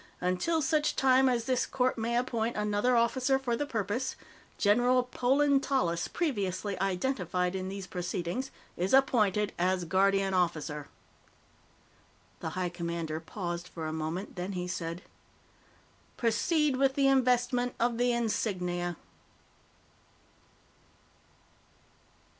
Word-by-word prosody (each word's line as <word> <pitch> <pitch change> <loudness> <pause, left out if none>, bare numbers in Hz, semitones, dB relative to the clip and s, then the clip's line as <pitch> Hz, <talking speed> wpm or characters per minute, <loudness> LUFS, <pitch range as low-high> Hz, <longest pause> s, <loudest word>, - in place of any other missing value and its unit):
"Until 185 - 0
such 305 +1 +1
time 265 0 +4
as 240 -2 +1
this 255 0 +1
Court 255 -1 +1
may 235 +1 -1
appoint 235 -2 -1
another 210 +4 +1
officer 255 +3 +2
for 255 -3 -1
the 290 +5 -2
purpose, 230 +3 -2 0.4
General 245 +5 +3
Polan 270 +3 +2
Tallis, 175 -13 0
previously 205 - -2
identified 180 -3 0
in 190 0 -3
these 195 0 -6
proceedings, 180 +7 -3 0.3
is 185 +8 +2
appointed 210 -6 +3
as 180 0 +1
Guardian 195 +2 +2
Officer." 155 -5 -1 1.5
The 160 - -4
High 180 -1 0
Commander 170 -2 -4
paused 175 0 -5
for 165 -3 -7
a 155 - -3
moment, 160 +5 -4
then 180 +3 -3
he 180 -1 -3
said: 170 0 -4 1.1
"Proceed 290 - +1
with 270 0 +2
the 275 -1 +3
investment 250 -2 +2
of 235 0 +1
the 245 0 +3
insignia." 180 -7 -1
210 Hz, 115 wpm, -30 LUFS, 180-255 Hz, 1.5 s, time